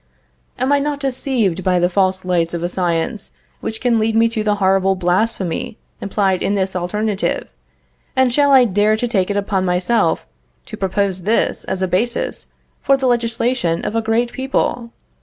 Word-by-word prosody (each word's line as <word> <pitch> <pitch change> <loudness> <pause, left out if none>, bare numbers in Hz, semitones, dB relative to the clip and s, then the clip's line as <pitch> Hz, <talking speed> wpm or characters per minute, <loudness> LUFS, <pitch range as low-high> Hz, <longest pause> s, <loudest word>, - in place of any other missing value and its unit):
"Am 260 +2 0
I 285 - +4
not 290 0 -2
deceived 250 - 0
by 180 0 +2
the 175 0 +3
false 185 0 0
lights 170 -2 0
of 170 - -4
a - - +1
science 175 +2 -2 0.3
which 220 - -5
can 235 -2 +2
lead 220 0 0
me 225 +1 +4
to 220 -1 -2
the 210 -1 +1
horrible 195 -1 +2
blasphemy 185 +1 -1 0.2
implied 195 -2 0
in 205 - 0
this 190 -1 -1
alternative, 205 +3 -2 0.7
and 260 -2 +3
shall 285 +1 +3
I 260 -2 +7
dare 210 +1 +2
to 245 - -1
take 195 -5 0
it 205 - -1
upon 200 -1 0
myself 180 +6 +1 0.4
to 215 - -8
propose 195 -1 -1
this 215 +6 0
as 190 0 -2
a - - +1
basis 230 +7 -1 0.3
for 275 - +3
the 270 - -2
legislation 235 -6 0
of 220 - -3
a 225 - +2
great 225 +2 0
people? 260 -2 -1
205 Hz, 175 wpm, -18 LUFS, 185-235 Hz, 0.7 s, I